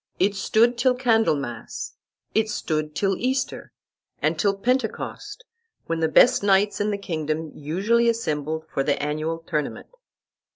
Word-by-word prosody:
It 195 +2 +2
stood 235 +5 +2
till 250 0 +3
Candlemas; 220 - 0 0.4
it 220 0 +2
stood 155 -7 -2
till 195 -1 +1
Easter, 260 +2 -2 0.5
and - - 0
till 200 -2 +2
Pentecost, 260 - -2 0.4
when 165 0 -2
the 160 - +2
best 240 +10 +5
knights 200 +1 +3
in 210 - +1
the 205 - -1
kingdom 160 -4 -3
usually 205 +11 +1
assembled 160 -8 -2
for - - -2
the 140 +1 0
annual 155 +3 -2
tournament. 155 -3 -4
195 Hz, 135 wpm, -24 LUFS, 155-230 Hz, 0.5 s, best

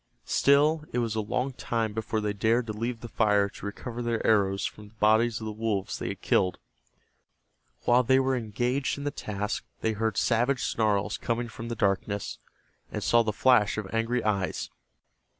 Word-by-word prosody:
Still 150 +3 +3
it - - -2
was 115 -3 0
a 110 - 0
long 125 +5 -2
time 115 -3 -2
before 110 0 -2
they 105 -1 -1
dared 115 +4 +2
to 110 - -4
leave 115 +2 -3
the 120 - -6
fire 105 -3 +2
to - - -11
recover 120 +3 -6
their 120 -1 -1
arrows 100 -3 +3
from 105 -1 -6
the 105 - -21
bodies 110 +2 +3
of 110 - -6
the 110 - -3
wolves 105 -3 -2
they - - -3
had - - -5
killed. 90 - +2 1.3
While 125 +1 +5
they 130 +2 +4
were 130 0 +1
engaged 125 +5 -1
in 140 - -6
the 145 - -1
task 105 -3 -3 0.2
they 110 - +1
heard 110 -1 -1
savage 120 +3 +2
snarls 105 -3 0
coming 120 0 -2
from 115 +1 -8
the 115 - -3
darkness, 100 -1 -1 0.5
and - - -4
saw 120 - +4
the 110 -2 0
flash 110 -1 +3
of 105 -1 -5
angry 115 +2 0
eyes. 100 -3 -1
110 Hz, 185 wpm, -28 LUFS, 105-120 Hz, 1.3 s, While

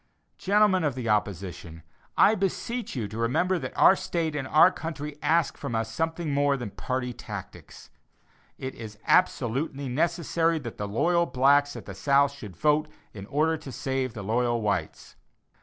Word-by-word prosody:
Gentlemen 200 -2 +3
of 145 -4 0
the 120 -3 -3
opposition, 90 -5 -2 0.3
I 210 - +6
beseech 220 +3 -2
you 115 -5 -2
to 110 +3 -7
remember 175 +11 +1
that 130 -3 -7
our 190 - +7
state 165 -4 -2
and 135 -3 -3
our 155 +6 +6
country 150 -4 -6
ask 165 -1 +1
from 115 - -4
us 115 0 -2
something 165 +2 -2
more 140 0 +2
than 120 -5 -6
party 125 +1 -3
tactics. - - -10 0.7
It 130 0 -5
is 110 -2 -9
absolutely 140 -4 +1
necessary 165 +3 +1
that 120 -7 -7
the 105 - -2
loyal 170 +11 +2
blacks 140 +2 +3
at 120 - -8
the 95 - -7
South 140 +8 +3
should 105 -10 -10
vote 150 - +2 0.3
in 100 -1 -9
order 160 +4 +1
to 140 - -9
save 130 0 -2
the 110 - -6
loyal 120 +3 +1
whites. 105 -2 -3
140 Hz, 165 wpm, -27 LUFS, 115-160 Hz, 0.7 s, our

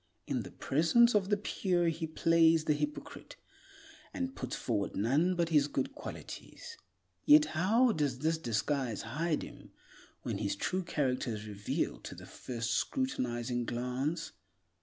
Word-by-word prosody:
In - - -1
the - - -8
presence 170 - +3
of 200 -2 +2
the 205 - +3
pure 180 -4 0
he 165 0 -3
plays 165 0 +4
the 155 - +3
hypocrite, 150 0 -5 0.8
and 265 0 -3
puts - - -4
forward 105 -5 -2
none 145 - +2
but 170 -1 0
his 150 -3 +4
good 265 - -2
qualities. 460 +9 -9 0.5
Yet 300 +1 +7
how 220 +9 +3
does 145 - 0
this 160 +4 0
disguise 120 -1 -1
hide 155 +7 -1
him - - -11 0.5
when - - -3
his 100 -2 -1
true 185 - -1
character 130 -8 -1
is 105 0 -7
revealed 105 -1 -3
to - - -7
the - - -11
first 115 -2 -4
scrutinizing 120 - -1
glance? 125 +7 -2
155 Hz, 145 wpm, -32 LUFS, 120-180 Hz, 0.8 s, Yet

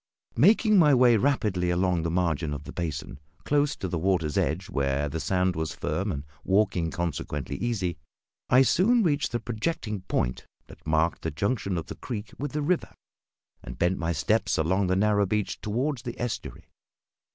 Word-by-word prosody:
Making 210 - +5
my 150 -5 +6
way 125 -2 +6
rapidly 105 -8 +1
along 90 -1 +1
the 85 - -1
margin 80 -3 0
of 70 - -7
the - - -9
basin, 75 -5 -4 0.2
close 145 0 +1
to 95 - -4
the 85 -2 -2
water's 80 -4 0
edge, 90 +4 0
where 70 +1 0
the 80 +3 -4
sand 90 +4 +1
was 80 -2 -3
firm 95 +7 -2
and 70 -3 -4
the - - -24 0.2
walking 95 -4 +2
consequently 80 -5 -3
easy, 95 -9 -2 0.5
I 130 +2 +6
soon 225 - +3
reached 145 -5 +1
the 120 - -1
projecting 110 - -3
point 60 - -1 0.2
that - - -15
marked 80 +2 +1
the - - -2
junction 100 - -1
of 80 - -3
the - - -7
creek 105 -4 -6
with 145 0 -4
the 150 0 -1
river, 175 +3 -1 0.7
and 60 +1 -9
bent 90 +5 +1
my 85 0 -1
steps 95 +6 +1
along 95 +4 +1
the 95 - +2
narrow 105 0 +2
beach 105 +1 -2
toward 125 +6 -1
the 120 0 -7
estuary. 110 - -5
95 Hz, 180 wpm, -27 LUFS, 80-120 Hz, 0.7 s, my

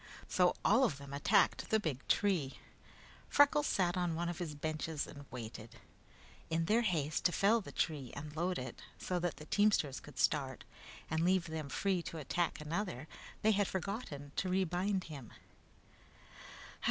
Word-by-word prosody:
So 180 -1 +3
all 230 +6 +6
of 175 - +2
them 140 0 -9
attacked 140 - +3
the 220 - +4
big 150 - -3
tree. 175 -10 +2 0.7
Freckles 290 +1 +5
sat 175 -2 +2
on 175 -2 0
one 170 +1 -1
of 175 - -4
his 160 -4 -4
benches 155 +1 -2
and 145 -1 -10
waited. 115 -2 -8 0.7
In 165 0 +1
their 220 +6 +4
haste 160 -8 0
to 175 - +5
fell 215 +6 +4
the - - -9
tree 145 -7 -1
and 150 +1 -7
load 180 +3 0
it, 125 -2 -6 0.2
so 180 -1 -2
that 175 -1 -2
the 155 - -9
teamsters 200 -8 +2
could 145 -3 -13
start, 135 -4 +1 0.5
and 160 - +1
leave 185 0 +3
them 160 -4 -4
free 190 +4 +1
to 165 - -6
attack 165 +4 -1
another, 155 -2 -3 0.4
they 220 - +6
had 205 -2 +2
forgotten 180 - -4
to 185 - 0
rebind 185 +1 +1
him. 140 -9 -9
165 Hz, 165 wpm, -35 LUFS, 145-190 Hz, 0.7 s, all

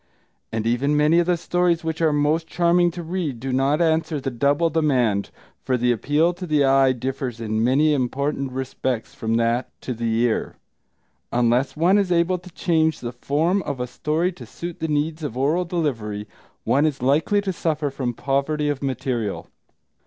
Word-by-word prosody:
And 110 0 -2
even 135 +6 +1
many 155 +3 +4
of 175 - +1
the 180 -1 +2
stories 175 0 +1
which 160 0 -3
are 160 -2 +4
most 150 +3 +1
charming 175 +1 +3
to 175 0 -7
read 165 -7 -3
do 130 +2 -3
not 135 +4 +2
answer 160 -1 +1
the 135 0 -3
double 145 +7 +1
demand, 125 -11 +1 0.3
for 130 - +1
the 120 0 +2
appeal 150 +8 +2
to 180 +1 -7
the 150 -2 +3
eye 135 0 +4
differs 130 -1 -4
in 110 -1 -1
many 145 +5 +3
important 140 +1 -1
respects 130 -2 -3
from 115 0 -2
that 115 +2 +1
to 130 - -4
the 115 0 -2
ear. 120 -2 0 0.8
Unless 120 +4 +1
one 180 +6 +4
is 195 -3 0
able 175 +1 +2
to 180 +1 -13
change 160 -2 +1
the 120 - -5
form 160 +10 0
of 140 -6 -4
a 125 - -1
story 155 +7 -1
to 180 - -11
suit 170 0 -7
the 160 - -2
needs 155 +2 -1
of 140 -6 -5
oral 155 +7 +1
delivery, 115 - -2 0.4
one 145 +3 +3
is 135 -4 -3
likely 150 +10 +2
to 195 -2 -2
suffer 155 -4 -1
from 125 -3 -3
poverty 140 +4 0
of 145 -2 -2
material. 130 -5 -3
145 Hz, 180 wpm, -23 LUFS, 125-165 Hz, 0.8 s, many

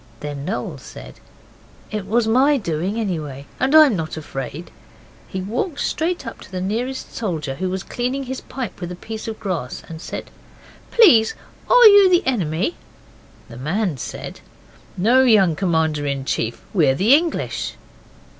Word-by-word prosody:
Then 145 -1 -5
Noel 205 +7 -4
said, - - -12 0.7
'It 210 -3 -4
was 225 +2 +2
my 270 +6 +4
doing 185 - -2
anyhow, 155 -10 -3 0.2
and 270 +4 +2
I'm 305 -7 +7
not 160 -2 -4
afraid,' 135 -4 -6
and 170 +3 -9 0.6
he 190 - -4
walked 250 - -3
straight 340 -1 -1
up 230 - -8
to - - -13
the 185 - -4
nearest 235 +8 -3
soldier, 160 -11 -3
who 185 +7 -3
was 190 +1 -3
cleaning 255 +3 -3
his 260 0 -5
pipe 250 -7 -6
with 175 0 -4
a - - -5
piece 220 +4 -7
of 220 -1 -5
grass, 175 -11 -4
and 160 -1 -9
said - - -7 0.6
'Please, 290 - +5 0.3
are - - +7
you 405 -3 +9
the 355 0 +3
enemy?' 195 - -1 0.7
The 120 -2 -11
man 165 - -1
said - - -7 0.6
'No, 235 +8 +4
young 210 -10 +4
Commander 160 -5 0
in 140 -1 -2
Chief, 115 -3 -2
we're 155 -9 +3
the 210 - +4
English. 330 +3 0
200 Hz, 160 wpm, -21 LUFS, 160-255 Hz, 0.7 s, you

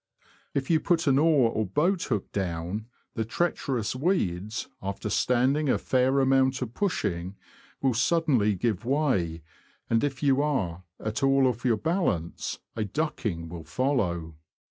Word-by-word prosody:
If 140 +3 0
you 160 - +5
put 170 0 +1
an 140 -1 +4
oar 145 -7 +4
or 110 - 0
boathook 145 - 0
down, 95 +3 -3 0.3
the 115 - -1
treacherous 125 -3 -1
weeds, 110 - -1
after 100 +2 -4
standing 135 +4 +2
a - - +3
fair 130 +1 +2
amount 130 0 +3
of 120 -2 -7
pushing, 95 - -2 0.5
will 135 -2 +3
suddenly 125 -5 +2
give 105 +1 -1
way, 115 - 0 0.5
and 115 0 +3
if 140 -1 -2
you 140 -1 +4
are 95 - -1
at 110 +1 -3
all 135 0 +4
off 125 -2 0
your 115 -3 +3
balance, 160 - -1 0.2
a 110 - -1
ducking 105 - -2
will 85 0 -8
follow. 85 - -1
125 Hz, 145 wpm, -27 LUFS, 100-140 Hz, 0.5 s, you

